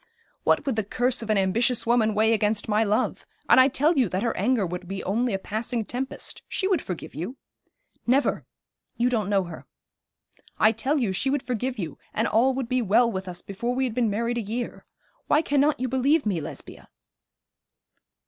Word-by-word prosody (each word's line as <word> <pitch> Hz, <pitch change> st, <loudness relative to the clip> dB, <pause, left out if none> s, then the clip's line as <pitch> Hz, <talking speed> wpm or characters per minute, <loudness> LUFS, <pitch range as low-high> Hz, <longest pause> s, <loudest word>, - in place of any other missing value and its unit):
'What -, -, +2 dB
would 270 Hz, -5 st, 0 dB
the 220 Hz, -, +1 dB
curse 245 Hz, +5 st, 0 dB
of 225 Hz, -, -7 dB
an 215 Hz, -, +3 dB
ambitious 230 Hz, +5 st, +2 dB
woman 230 Hz, -2 st, +2 dB
weigh 220 Hz, +2 st, +4 dB
against 210 Hz, -1 st, 0 dB
my 215 Hz, +1 st, +2 dB
love? 210 Hz, 0 st, -1 dB, 0.2 s
And -, -, +7 dB
I 260 Hz, -, +7 dB
tell 295 Hz, +3 st, +2 dB
you 245 Hz, -7 st, +3 dB
that 185 Hz, +4 st, -2 dB
her 235 Hz, -, 0 dB
anger 245 Hz, -6 st, +1 dB
would 180 Hz, +1 st, -6 dB
be 195 Hz, +1 st, -5 dB
only 230 Hz, +6 st, 0 dB
a 195 Hz, -, 0 dB
passing 220 Hz, +3 st, -3 dB
tempest. 260 Hz, +4 st, -5 dB
She 380 Hz, -, -1 dB
would 380 Hz, -3 st, +2 dB
forgive 180 Hz, -3 st, -6 dB
you.' 180 Hz, -, -5 dB, 0.7 s
'Never 265 Hz, +4 st, +2 dB, 0.5 s
you 240 Hz, +1 st, +2 dB
don't 215 Hz, -5 st, 0 dB
know 200 Hz, -2 st, +2 dB
her.' 170 Hz, -3 st, -10 dB, 0.9 s
'I 215 Hz, -, +5 dB
tell 265 Hz, +7 st, 0 dB
you 230 Hz, -7 st, 0 dB
she 225 Hz, +8 st, -1 dB
would 280 Hz, -1 st, 0 dB
forgive 250 Hz, 0 st, -2 dB
you, 165 Hz, -8 st, -5 dB, 0.2 s
and 225 Hz, +2 st, +1 dB
all 255 Hz, +4 st, +3 dB
would 265 Hz, -3 st, -2 dB
be 255 Hz, 0 st, +1 dB
well 230 Hz, +3 st, +3 dB
with 190 Hz, -2 st, -5 dB
us 175 Hz, -1 st, -6 dB
before 235 Hz, +5 st, -3 dB
we 265 Hz, -, +1 dB
had 250 Hz, -4 st, -1 dB
been 235 Hz, -2 st, +1 dB
married 235 Hz, +3 st, -1 dB
a -, -, -1 dB
year. 230 Hz, +3 st, -5 dB, 0.4 s
Why 300 Hz, -, +3 dB
cannot 290 Hz, -1 st, +2 dB
you 255 Hz, -, -1 dB
believe 265 Hz, +5 st, +2 dB
me, 190 Hz, -6 st, 0 dB
Lesbia?' 145 Hz, -1 st, -9 dB
230 Hz, 200 wpm, -25 LUFS, 205-255 Hz, 0.9 s, And